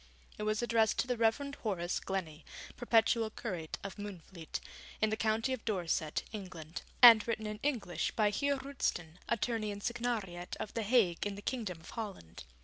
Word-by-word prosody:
It 210 0 0
was 215 +2 0
addressed 225 -2 +3
to - - +2
the 250 - +1
Reverend 235 +5 +1
Horace 180 -5 -1
Glennie, 170 -5 -4 0.3
Perpetual 230 -1 +3
Curate 180 -8 -5
of 195 +1 -6
Moonfleet, 185 -4 -6 0.4
in 215 0 +2
the - - +2
County 225 +4 +1
of 255 - -5
Dorset, 170 -7 -1
England, 180 -6 -7 0.2
and 230 -3 +10
written 220 -2 -1
in 210 0 -4
English 245 -11 0
by 210 -2 +3
Heer 280 +6 +1
Roosten, 220 - -3
Attorney 230 -2 0
and 200 0 -7
Signariat 220 -7 -2
of 215 - -5
the 230 - -1
Hague 205 -5 +3
in 200 - -4
the 205 - -9
Kingdom 205 -10 -3
of 160 - -11
Holland. 195 - -7
215 Hz, 170 wpm, -33 LUFS, 185-230 Hz, 0.4 s, and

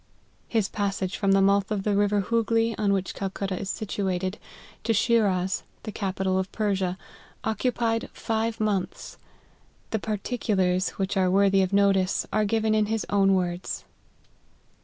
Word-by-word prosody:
His 220 -4 +1
passage 195 -2 -2
from 195 -1 +2
the 195 0 +5
mouth 200 0 +3
of 205 -2 -1
the 205 -1 +1
river 205 0 +2
Hoogley, 230 +1 +1
on 205 -1 +1
which 190 -1 0
Calcutta 195 -1 -3
is 195 - -3
shifted, 190 -2 -2 0.4
to 225 - +1
Shiraz, 195 -5 +2 0.2
the 215 - -5
capi 195 -2 -3
tal 190 0 +2
of 190 0 -3
Persia, 195 -4 -1 0.5
occupied 230 0 0
five 225 0 -2
months. 205 -4 -2 0.7
The 220 - 0
particu 215 +1 -2
lars, 185 0 +2
which 195 +1 -1
are 185 -1 +3
worthy 195 +1 +4
of 190 0 0
notice, 195 -2 +3
are 215 0 +2
given 220 +1 +1
in 215 -1 +2
his 220 0 -1
own 195 -1 +4
words. 180 -1 -2
200 Hz, 155 wpm, -26 LUFS, 190-215 Hz, 0.7 s, the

